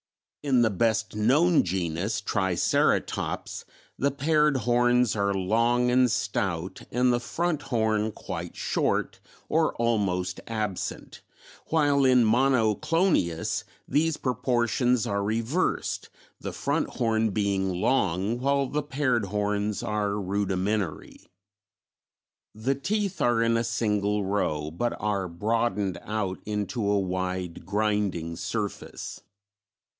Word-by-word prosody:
In 130 Hz, -4 st, +3 dB
the 110 Hz, -, +2 dB
best 110 Hz, +2 st, 0 dB
known 145 Hz, +11 st, +4 dB
genus, 90 Hz, +3 st, -2 dB
Triceratops, 95 Hz, -4 st, 0 dB, 0.4 s
the 140 Hz, -, +3 dB
paired 150 Hz, +1 st, +2 dB
horns 120 Hz, 0 st, +2 dB
are 100 Hz, -1 st, +1 dB
long 115 Hz, +6 st, +2 dB
and 125 Hz, 0 st, +4 dB
stout 95 Hz, -6 st, -2 dB
and 125 Hz, +1 st, +3 dB
the 120 Hz, -, +1 dB
front 160 Hz, +5 st, -1 dB
horn 110 Hz, -3 st, 0 dB
quite -, -, -6 dB
short -, -, -1 dB, 0.3 s
or -, -, +1 dB
almost 95 Hz, -6 st, 0 dB
absent, 110 Hz, -5 st, -4 dB, 0.5 s
while 145 Hz, -3 st, +3 dB
in 125 Hz, -2 st, +5 dB
Monoclonius 115 Hz, -, +2 dB, 0.2 s
these 160 Hz, +1 st, +1 dB
proportions 125 Hz, -1 st, +1 dB
are 100 Hz, 0 st, -1 dB
reversed, 115 Hz, -, -1 dB, 0.3 s
the -, -, -5 dB
front -, -, -1 dB
horn 110 Hz, -1 st, +1 dB
being 100 Hz, -2 st, 0 dB
long 95 Hz, +2 st, 0 dB
while 140 Hz, +1 st, +2 dB
the 150 Hz, +3 st, -2 dB
paired 135 Hz, -6 st, 0 dB
horns 105 Hz, +1 st, -1 dB
are 105 Hz, -1 st, -1 dB
rudimentary. 100 Hz, -2 st, -2 dB, 1.3 s
The 115 Hz, +6 st, 0 dB
teeth 195 Hz, +4 st, -2 dB
are 120 Hz, -3 st, +3 dB
in 115 Hz, 0 st, +2 dB
a 115 Hz, -, +1 dB
single 105 Hz, -3 st, 0 dB
row 75 Hz, -6 st, -1 dB
but 120 Hz, +9 st, -2 dB
are 100 Hz, -3 st, -1 dB
broadened 105 Hz, +1 st, -1 dB
out 100 Hz, -3 st, -3 dB
into 105 Hz, +1 st, -2 dB
a 100 Hz, 0 st, +3 dB
wide 90 Hz, -2 st, -3 dB
grinding 100 Hz, -5 st, 0 dB
surface. 105 Hz, +4 st, -5 dB
110 Hz, 110 wpm, -27 LUFS, 100-125 Hz, 1.3 s, in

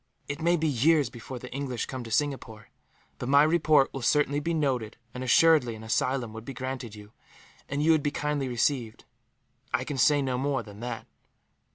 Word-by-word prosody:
"It 145 Hz, +2 st, -5 dB
may 170 Hz, +2 st, +3 dB
be 160 Hz, 0 st, 0 dB
years 145 Hz, +1 st, +3 dB
before 120 Hz, +2 st, -8 dB
the 125 Hz, +1 st, -10 dB
English 135 Hz, -3 st, -3 dB
come 130 Hz, -2 st, -6 dB
to -, -, -8 dB
Singapore; 115 Hz, -4 st, -2 dB, 0.5 s
but 125 Hz, -, -4 dB
my 140 Hz, +1 st, +6 dB
report 155 Hz, -3 st, +3 dB
will 135 Hz, -, -5 dB
certainly 145 Hz, +2 st, +2 dB
be 165 Hz, +3 st, -2 dB
noted 130 Hz, -9 st, -1 dB, 0.2 s
and, 125 Hz, -, -5 dB
assuredly, 130 Hz, -2 st, +4 dB
an 110 Hz, -, -11 dB
asylum 120 Hz, +1 st, -1 dB
would 110 Hz, 0 st, -8 dB
be 135 Hz, +2 st, -8 dB
granted 130 Hz, -3 st, -5 dB
you, 105 Hz, 0 st, -13 dB, 0.6 s
and 145 Hz, +1 st, -1 dB
you 165 Hz, -, +5 dB
would 160 Hz, -2 st, +4 dB
be 145 Hz, -, 0 dB
kindly 145 Hz, -1 st, -2 dB
received. 120 Hz, -2 st, -1 dB, 0.7 s
I 130 Hz, 0 st, 0 dB
can 135 Hz, 0 st, -4 dB
say 145 Hz, +3 st, +4 dB
no 130 Hz, -2 st, -1 dB
more 135 Hz, -2 st, -1 dB
than 105 Hz, -1 st, -12 dB
that." 120 Hz, -1 st, -5 dB
135 Hz, 195 wpm, -27 LUFS, 120-145 Hz, 0.7 s, my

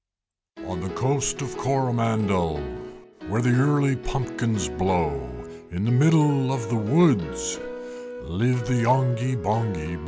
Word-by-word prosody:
On 95 Hz, -, -5 dB
the 95 Hz, +1 st, -5 dB
Coast 135 Hz, +1 st, 0 dB
of 125 Hz, -, -6 dB
Coromandel 115 Hz, -, 0 dB, 0.7 s
Where 110 Hz, +4 st, -1 dB
the 125 Hz, -1 st, +3 dB
early 140 Hz, +1 st, +3 dB
pumpkins 120 Hz, -4 st, -2 dB
blow, 85 Hz, +4 st, 0 dB, 0.6 s
In 90 Hz, +4 st, -3 dB
the 115 Hz, -, +1 dB
middle 145 Hz, -1 st, +4 dB
of 115 Hz, -4 st, -3 dB
the 120 Hz, -, 0 dB
woods 105 Hz, -, +2 dB, 0.6 s
Lived 125 Hz, +6 st, -1 dB
the 125 Hz, -1 st, +1 dB
Yonghy 130 Hz, 0 st, +2 dB
Bonghy 100 Hz, -8 st, -2 dB
Bò. -, -, -10 dB
120 Hz, 125 wpm, -24 LUFS, 100-130 Hz, 0.7 s, middle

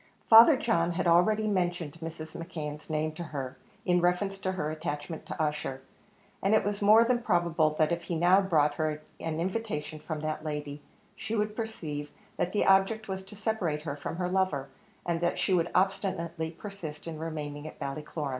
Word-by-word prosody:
Father 235 Hz, +6 st, +9 dB
John 175 Hz, -, +1 dB
had 185 Hz, -, -1 dB
already 180 Hz, +6 st, +4 dB
mentioned 175 Hz, -6 st, -1 dB
Mrs. 160 Hz, -1 st, -7 dB
McKeon's 155 Hz, -3 st, -6 dB
name 155 Hz, 0 st, 0 dB
to 170 Hz, +2 st, -7 dB
her, 135 Hz, -5 st, -5 dB, 0.3 s
in 180 Hz, -1 st, +3 dB
reference 195 Hz, +3 st, +1 dB
to 190 Hz, -1 st, -1 dB
her 155 Hz, -5 st, -2 dB
attachment 155 Hz, 0 st, -5 dB
to -, -, -6 dB
Ussher; 150 Hz, -3 st, -2 dB, 0.6 s
and 195 Hz, +3 st, +3 dB
it -, -, +3 dB
was 205 Hz, 0 st, -2 dB
more 215 Hz, +3 st, +7 dB
than 240 Hz, 0 st, +1 dB
probable 170 Hz, -6 st, +2 dB
that 155 Hz, 0 st, +3 dB
if 170 Hz, 0 st, -2 dB
he 170 Hz, -, -2 dB
now 180 Hz, +4 st, +5 dB
brought 155 Hz, -6 st, +3 dB
her 155 Hz, 0 st, -2 dB, 0.2 s
an 160 Hz, -1 st, -3 dB
invitation 170 Hz, -5 st, -3 dB
from 155 Hz, -1 st, -5 dB
that 155 Hz, 0 st, -3 dB
lady, 150 Hz, -1 st, -4 dB, 0.3 s
she 220 Hz, +3 st, -4 dB
would 210 Hz, 0 st, 0 dB
perceive 155 Hz, -11 st, -4 dB, 0.3 s
that 175 Hz, -, 0 dB
the 210 Hz, -, +1 dB
object 195 Hz, +3 st, +3 dB
was 190 Hz, -1 st, -3 dB
to 190 Hz, +2 st, -12 dB
separate 195 Hz, -8 st, -1 dB
her 145 Hz, -3 st, -3 dB
from 150 Hz, -, -5 dB
her 180 Hz, +1 st, -1 dB
lover, 180 Hz, -7 st, 0 dB, 0.4 s
and 170 Hz, -1 st, -1 dB
that 175 Hz, -, +1 dB
she 190 Hz, -, +1 dB
would 175 Hz, -1 st, +2 dB
obstinately 185 Hz, -4 st, 0 dB
persist 165 Hz, -4 st, -8 dB
in 165 Hz, -2 st, -6 dB
remaining 150 Hz, -2 st, -5 dB
at -, -, -10 dB
Ballycloran. 145 Hz, +1 st, -4 dB
170 Hz, 185 wpm, -29 LUFS, 155-195 Hz, 0.6 s, Father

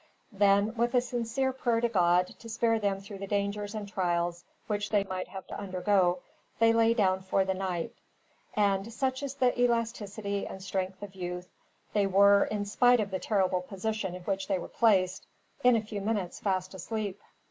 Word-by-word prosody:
Then, 200 Hz, +1 st, +3 dB
with 240 Hz, +2 st, +1 dB
a 250 Hz, -, +5 dB
sincere 245 Hz, +2 st, -1 dB
prayer 240 Hz, -3 st, +1 dB
to 235 Hz, -, +2 dB
God, 180 Hz, -4 st, +3 dB
to 230 Hz, -, -10 dB
spare 225 Hz, 0 st, +1 dB
them 200 Hz, -2 st, -1 dB
through 200 Hz, 0 st, -9 dB
the 195 Hz, -, -5 dB
dangers 205 Hz, +1 st, -2 dB
and 210 Hz, -1 st, -4 dB
trials 175 Hz, -3 st, -1 dB, 0.2 s
which 205 Hz, -1 st, -2 dB
they 205 Hz, -2 st, +2 dB
might 185 Hz, -1 st, -4 dB
have 190 Hz, -1 st, -8 dB
to -, -, -7 dB
undergo, 185 Hz, -2 st, +1 dB, 0.4 s
they 225 Hz, 0 st, +5 dB
lay 230 Hz, 0 st, +4 dB
down 190 Hz, -4 st, +2 dB
for 190 Hz, 0 st, +1 dB
the 190 Hz, -, 0 dB
night; 185 Hz, -3 st, -3 dB, 0.6 s
and, 200 Hz, +1 st, +1 dB
such 260 Hz, +2 st, -1 dB
is 280 Hz, -1 st, -4 dB
the 255 Hz, -2 st, +3 dB
elasticity 220 Hz, -4 st, -1 dB
and 190 Hz, -, -8 dB
strength 190 Hz, 0 st, -3 dB
of 200 Hz, -2 st, -8 dB
youth, 180 Hz, -1 st, -6 dB, 0.4 s
they 205 Hz, -2 st, +3 dB
were, 200 Hz, +1 st, +6 dB
in 210 Hz, -1 st, -2 dB
spite 245 Hz, +4 st, +4 dB
of 205 Hz, -2 st, -2 dB
the 190 Hz, -, -2 dB
terrible 190 Hz, -3 st, +1 dB
position 195 Hz, 0 st, -3 dB
in 180 Hz, -, -9 dB
which 195 Hz, 0 st, -2 dB
they 195 Hz, -, +1 dB
were 175 Hz, -, -6 dB
placed, 190 Hz, -5 st, +2 dB, 0.4 s
in 250 Hz, -1 st, +6 dB
a 225 Hz, -, +1 dB
few 210 Hz, -1 st, -5 dB
minutes 200 Hz, -4 st, -2 dB
fast 185 Hz, -2 st, -1 dB
asleep. 200 Hz, +1 st, -4 dB
200 Hz, 190 wpm, -29 LUFS, 190-225 Hz, 0.6 s, were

